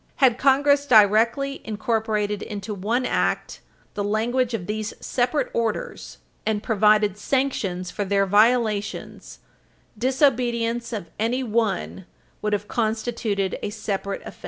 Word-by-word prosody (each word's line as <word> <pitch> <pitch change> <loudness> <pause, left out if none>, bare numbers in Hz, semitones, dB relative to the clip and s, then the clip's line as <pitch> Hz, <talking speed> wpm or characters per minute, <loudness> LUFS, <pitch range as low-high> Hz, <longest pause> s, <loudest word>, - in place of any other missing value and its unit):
Had 255 -3 +3
Congress 285 +1 +3
directly 230 +5 +4
incorporated 215 -1 -1
into 205 0 -5
one 225 +6 -1
Act - - -1 0.3
the 205 - -2
language 230 +4 0
of 185 -6 -5
these 215 +2 -4
separate 250 +4 -1
orders, 235 - -3 0.3
and 215 -1 -1
provided 210 -2 +3
sanctions 210 -9 -1
for 205 - -2
their 195 0 +2
violations, 210 0 +1 0.6
disobedience 240 -2 +1
of 200 -8 -5
any 240 +4 0
one 215 -5 -1 0.3
would 210 0 -1
have 205 0 -1
constituted 220 -3 -1
a - - -3
separate 200 -2 -4
offense. - - -10
220 Hz, 120 wpm, -23 LUFS, 205-245 Hz, 0.6 s, directly